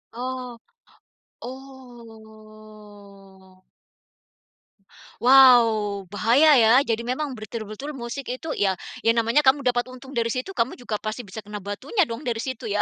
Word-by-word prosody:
Oh. 250 -1 -6 0.8
Oh. 215 -6 -14 1.6
Wow, 230 -6 +5
bahaya, 230 - +3
ya. 225 -2 +5
Jadi 235 -3 -2
memang 260 +1 -3
betul-betul 215 +6 -7
musik 250 +1 -6
itu, 315 +6 -8
ya, 195 -2 +2 0.4
namanya 230 +5 +2
kamu 270 +2 +4
dapat 245 -2 0
untung 265 +1 -13
dari 230 0 0
situ, 255 +7 -4
kamu 230 +3 0
juga 225 -4 -4
pasti 215 +3 -5
bisa 215 0 -10
kena 210 0 -7
batunya 230 - -3
dong 230 +6 -7
dari 230 -2 -2
situ, 260 -2 -6
ya. 210 -1 0
230 Hz, 125 wpm, -23 LUFS, 215-255 Hz, 1.6 s, Wow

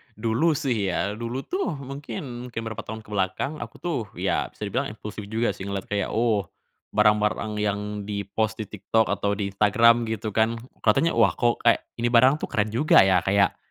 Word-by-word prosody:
dulu 115 +9 +1
sih 125 -9 0
ya 100 +4 -1
dulu 120 +3 -4
tuh, 370 - -2
mungkin 130 -3 -7
mungkin 120 - -5
beberapa 110 -1 -6
tahun 110 0 -6
ke - - -19
belakang, 105 +10 -1
aku - - -8
tuh, 170 -6 -1 0.2
ya, - - 0
bisa - - -28
dibilang 125 +7 -1
impulsif 105 -1 -8
juga 115 +3 0
sih, 95 - -8
ngelihat 100 -1 -4
kayak, 105 -1 -1
"oh, 110 -5 +1 0.5
barang-barang 105 0 +2
yang 105 -1 0 0.3
di-post 105 +2 -2
di - - -4
TikTok 105 +1 0
atau 100 +1 0
di 100 -1 -2
Instagram," 115 +4 +4
gitu 110 -1 -3
kan. 110 +2 +2 0.2
Kelihatannya, 140 +10 +3
"wah, 110 -4 +5
kok 120 -1 +1
kayak, 115 - +5 0.2
ini 120 - +1
barang 130 +3 +7
tuh - - -3
keren 105 0 0
juga, 135 +8 +5
ya." 95 -1 +4
Kayak, 100 0 +3
110 Hz, 190 wpm, -25 LUFS, 105-120 Hz, 0.5 s, barang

